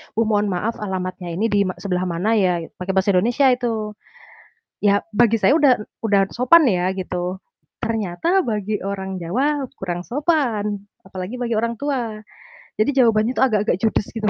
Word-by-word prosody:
"Bu, 225 Hz, -, +3 dB
mohon 210 Hz, -2 st, +1 dB
maaf 200 Hz, +4 st, -2 dB
alamatnya 185 Hz, -3 st, -4 dB
ini 225 Hz, +5 st, 0 dB
di 205 Hz, -, +3 dB
ma 185 Hz, -, -4 dB
sebelah 185 Hz, -2 st, -2 dB
mana 175 Hz, +5 st, -1 dB
ya?" 180 Hz, -3 st, +1 dB, 0.2 s
Pakai 185 Hz, +1 st, -3 dB
bahasa 190 Hz, +1 st, +3 dB
Indonesia 235 Hz, +9 st, +3 dB
itu. 230 Hz, -4 st, -1 dB, 0.9 s
Ya 205 Hz, 0 st, +2 dB
bagi 230 Hz, +1 st, +3 dB
saya 275 Hz, +8 st, +3 dB
udah 280 Hz, -4 st, +5 dB, 0.3 s
udah 200 Hz, -2 st, +4 dB
sopan 255 Hz, +8 st, +5 dB
ya 185 Hz, +1 st, 0 dB
gitu, 180 Hz, -1 st, -3 dB, 0.5 s
ternyata 225 Hz, -, 0 dB
bagi 210 Hz, -2 st, -2 dB
orang 190 Hz, -1 st, -4 dB
Jawa 270 Hz, -, 0 dB
kurang 175 Hz, -2 st, -4 dB
sopan 235 Hz, -, -1 dB, 0.2 s
apalagi 190 Hz, +4 st, -6 dB
bagi 245 Hz, -2 st, -2 dB
orang 235 Hz, +1 st, -1 dB
tua. 245 Hz, -4 st, -2 dB, 0.6 s
Jadi, 215 Hz, +7 st, +2 dB
jawabannya 230 Hz, -2 st, +3 dB
tuh, -, -, -2 dB
agak-agak 215 Hz, -7 st, +2 dB
judes 220 Hz, -2 st, +1 dB
gitu. 215 Hz, -2 st, -1 dB
210 Hz, 160 wpm, -21 LUFS, 190-240 Hz, 0.9 s, udah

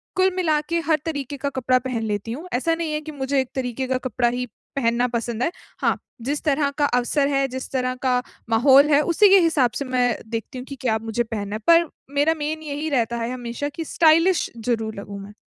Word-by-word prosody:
कुल 375 Hz, 0 st, +3 dB
मिला 315 Hz, -5 st, +2 dB
के 335 Hz, 0 st, +1 dB
हर 315 Hz, -2 st, +3 dB
तरीके 285 Hz, -3 st, -4 dB
का 280 Hz, +1 st, -2 dB
कपड़ा 255 Hz, -1 st, +1 dB
पहन 250 Hz, -3 st, -3 dB
लेती 210 Hz, 0 st, -3 dB
हूँ। 305 Hz, +10 st, -6 dB
ऐसा 325 Hz, +7 st, +1 dB
नहीं 330 Hz, -2 st, -3 dB
है 305 Hz, -, -1 dB
कि 310 Hz, 0 st, -8 dB
मुझे 275 Hz, -1 st, -1 dB
एक 260 Hz, -, -6 dB
तरीके 260 Hz, 0 st, -2 dB
का 260 Hz, 0 st, +1 dB
कपड़ा 240 Hz, 0 st, +1 dB
ही 250 Hz, +1 st, -2 dB, 0.3 s
पहनना 240 Hz, -2 st, +1 dB
पसंद 235 Hz, 0 st, -2 dB
है। 330 Hz, -, +1 dB, 0.3 s
हाँ, -, -, +2 dB, 0.2 s
जिस 285 Hz, +5 st, -2 dB
तरह 290 Hz, -1 st, +2 dB
का 295 Hz, -, +3 dB
अवसर 275 Hz, +2 st, +1 dB
है, 275 Hz, -1 st, +1 dB
जिस 260 Hz, 0 st, -6 dB
तरह 255 Hz, -1 st, -1 dB
का 250 Hz, -1 st, +2 dB, 0.3 s
माहौल 265 Hz, +5 st, +6 dB
है, 290 Hz, -1 st, +5 dB
उसी 355 Hz, +6 st, +4 dB
के 395 Hz, -, +8 dB
हिसाब 315 Hz, -8 st, +3 dB
से 280 Hz, -, -3 dB
मैं 250 Hz, -2 st, +1 dB
देखती 230 Hz, +3 st, -5 dB
हूँ 250 Hz, -, -6 dB
कि 280 Hz, -, -7 dB
क्या 225 Hz, -4 st, +1 dB
मुझे 225 Hz, +1 st, -1 dB
पहनना 210 Hz, -3 st, -4 dB
है, -, -, -4 dB
पर 335 Hz, -1 st, +6 dB, 0.3 s
मेरा 290 Hz, +3 st, +3 dB
मेन 310 Hz, +1 st, -3 dB
यही 300 Hz, +1 st, -3 dB
रहता 235 Hz, -4 st, 0 dB
है 230 Hz, +1 st, -2 dB
हमेशा 245 Hz, +3 st, -4 dB
कि 325 Hz, +2 st, -6 dB
स्टाइलिश 330 Hz, +3 st, +3 dB, 0.2 s
ज़रूर 225 Hz, -2 st, -1 dB
लगूँ 200 Hz, 0 st, -8 dB
मैं। 205 Hz, +1 st, -11 dB
265 Hz, 225 wpm, -23 LUFS, 240-300 Hz, 0.3 s, के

